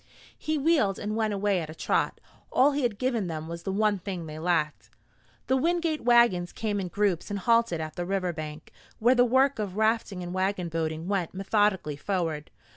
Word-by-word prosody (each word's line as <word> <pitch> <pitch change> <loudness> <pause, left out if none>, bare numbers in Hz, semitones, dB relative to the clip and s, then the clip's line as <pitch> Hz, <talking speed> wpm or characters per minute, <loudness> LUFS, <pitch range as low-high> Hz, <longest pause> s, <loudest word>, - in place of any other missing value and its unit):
He 310 0 -2
wheeled 280 - +2
and 215 +1 -3
went 220 -1 0
away 200 -2 +1
at 155 - -6
a 155 - -8
trot. - - 0 0.3
All 275 +3 +5
he 290 +1 -1
had 235 -5 0
given 235 -5 0
them 160 -1 -5
was 170 0 -6
the 195 - -3
one 205 0 +1
thing 180 -2 -5
they 155 0 -7
lacked. 165 -3 -1 0.6
The 260 - +2
Wingate 330 +2 0
wagons 235 -8 +4
came 210 -2 -2
in 190 - -3
groups 190 -1 0
and 205 - -2
halted 230 -4 +2
at 155 -1 -5
the 175 - -2
river 185 -2 -1
bank, 155 -1 -7 0.3
where 240 +3 +4
the 245 -1 +5
work 260 +1 +3
of 200 -2 -3
rafting 220 -4 +1
and 175 0 -5
wagon 185 -1 -1
boating 160 0 -3
went 190 -3 -1
methodically 195 -6 +1
forward. 165 -3 -2
195 Hz, 195 wpm, -27 LUFS, 170-230 Hz, 0.6 s, All